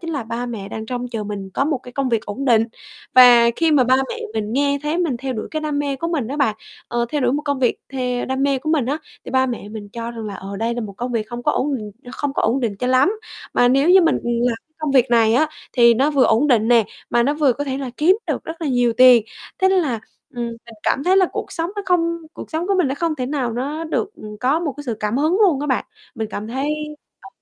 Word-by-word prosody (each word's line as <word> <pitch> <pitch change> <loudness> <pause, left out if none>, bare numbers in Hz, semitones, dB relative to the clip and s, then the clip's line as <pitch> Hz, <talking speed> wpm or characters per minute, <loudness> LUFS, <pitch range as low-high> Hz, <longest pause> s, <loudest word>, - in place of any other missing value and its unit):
chính 335 -1 -5
là 285 -5 -2
ba 235 +2 -4
mẹ 210 -5 -6
đang 220 +1 -6
trông 245 +1 -4
chờ 225 -3 -4
mình 200 -2 -6
có - - +1
một 295 -2 0
cái 250 0 -13
công 275 0 -1
việc 230 -3 0
ổn 250 +7 -4
định. 225 -4 +4 0.5
Và 240 -2 +8
khi 330 -1 +2
mà 270 -4 +5
ba 255 +2 +4
mẹ - - -4 0.2
mình 215 -1 -2
nghe 280 +2 +1
thấy 300 +3 -1
mình 330 -8 0
theo 260 +2 -4
đuổi 220 - -5
cái 310 - -2
đam 300 -2 -1
mê 285 -1 -1
của 335 +5 -3
mình 290 -9 -2
á 280 - -4
bạn, 245 -8 +1 0.3
ờ, 240 0 -1
theo 295 - -1
đuổi 250 -1 +2
một 295 - -1
công 285 -2 -1
việc 245 -3 +2 0.2
theo 250 -2 -2
đam 265 +1 -2
mê 275 -1 +2
của 310 +4 -3
mình 290 -7 +1
á, 285 +3 -1 0.3
thì - - -7
ba 260 0 +2
mẹ 235 -5 -5
mình 210 -1 -8
cho 230 0 -5
rằng 230 -2 -7
là, 205 - -5
ờ, 195 +1 -7
đây 230 +3 -1
là 240 - -3
một 210 -3 -6
công 245 +2 -4
việc 220 -2 -1
không 240 +1 -6
có - - +2
ổn 290 - 0
định 210 -2 -8 0.2
không 285 0 -3
có - - 0
ổn 240 +5 +1
định 220 -5 -2
cho 250 - -2
lắm. 260 +8 +4 0.4
Mà 245 - +4
nếu 275 +6 +3
như 380 0 +8
mình 325 - +3
làm 240 0 0
cái 315 - -47
công 305 -3 -2
việc 260 -2 +3
này 225 -1 +4
á, 310 +5 +3 0.2
thì 235 -2 +6
nó 275 +6 +2
vừa 275 -4 +3
ổn 250 +7 +3
định 230 -5 +3
nè, 235 -2 +5 0.3
mà 235 - +3
nó 285 +4 +1
vừa 295 -4 +3
có 285 +4 -4
thể 270 -1 -3
là 270 -2 -4
kiếm 355 +6 +4
được - - -2
rất 325 +1 -7
là 305 - -1
nhiều 245 -2 +2
tiền. 250 -1 +7 0.4
Thế 380 - +5
nên 380 -1 +3
là, 240 -7 -2 0.3
ừm, 240 -1 -3
mình 230 - -7 0.3
cảm 275 - 0
thấy 370 +1 +4
là 380 -1 +5
cuộc - - -5
sống 330 +2 -2
nó 410 - -2
không 335 -2 +1
cuộc - - -10
sống 325 +2 -2
của 400 - +1
mình 345 -7 +3
nó 270 - -1
không 330 +2 -1
thể 255 -2 -3
nào 260 -4 -2
nó 285 +7 -3
được, 355 +5 -2
ừm, 210 0 -10
có 275 +6 +2
một 305 -5 -2
cái 290 - -8
sự 235 - -1
cảm 210 +2 -1
hứng 310 +4 +2
luôn 350 -10 +4
các 295 - -2
bạn. 260 -3 0 0.3
Mình 220 -1 -4
cảm 210 +1 -5
thấy, 265 +5 -2 0.5
ờ, - - -13
255 Hz, 290 wpm, -20 LUFS, 235-295 Hz, 0.5 s, Và